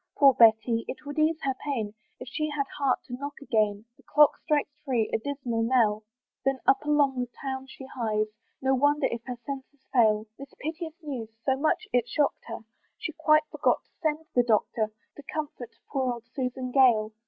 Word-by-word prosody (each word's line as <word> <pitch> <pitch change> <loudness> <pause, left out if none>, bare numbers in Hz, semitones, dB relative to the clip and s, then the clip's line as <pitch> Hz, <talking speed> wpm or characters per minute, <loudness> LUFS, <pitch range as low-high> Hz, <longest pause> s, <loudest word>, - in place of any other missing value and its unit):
Poor 275 -2 +7
Betty! 230 0 +5
it 265 - -7
would 290 +1 -4
ease 315 +1 +3
her 270 - +1
pain 225 -8 -2 0.3
If 250 - -8
she 305 +5 -2
had 295 -2 -1
heart 275 -3 +1
to 245 - -9
knock 285 +3 -5
again; 215 -5 0
The - - -20
clock 295 -1 +5
strikes 295 -1 +1
three 245 -6 0
a - - +2
dismal 250 -3 -2
knell! 225 -3 +2 0.4
Then 270 0 +1
up 270 - +4
along 290 -3 +3
the 245 -1 -2
town 265 -1 -4
she 265 0 -10
hies, 220 -5 -1 0.4
No 265 0 +3
wonder 290 +2 +3
if 235 - -3
her 250 -1 -4
senses 275 0 -7
fail, 215 -4 +4
This 275 0 -10
piteous 320 +1 -5
news 255 -7 -5 0.2
so 265 - +3
much 295 +3 0
it 245 -1 +2
shock'd 290 +2 0
her, 230 - -6 0.4
She 325 - -4
quite 310 0 +4
forgot - - +1
to - - -38
send 315 -1 0
the 245 - +5
Doctor, 220 -1 +1 0.3
To 290 - -10
comfort 290 -6 -5 0.2
poor 260 -2 0
old 235 -1 -9
Susan 255 -1 -3
Gale. 235 -5 +4
265 Hz, 190 wpm, -27 LUFS, 235-290 Hz, 0.4 s, Poor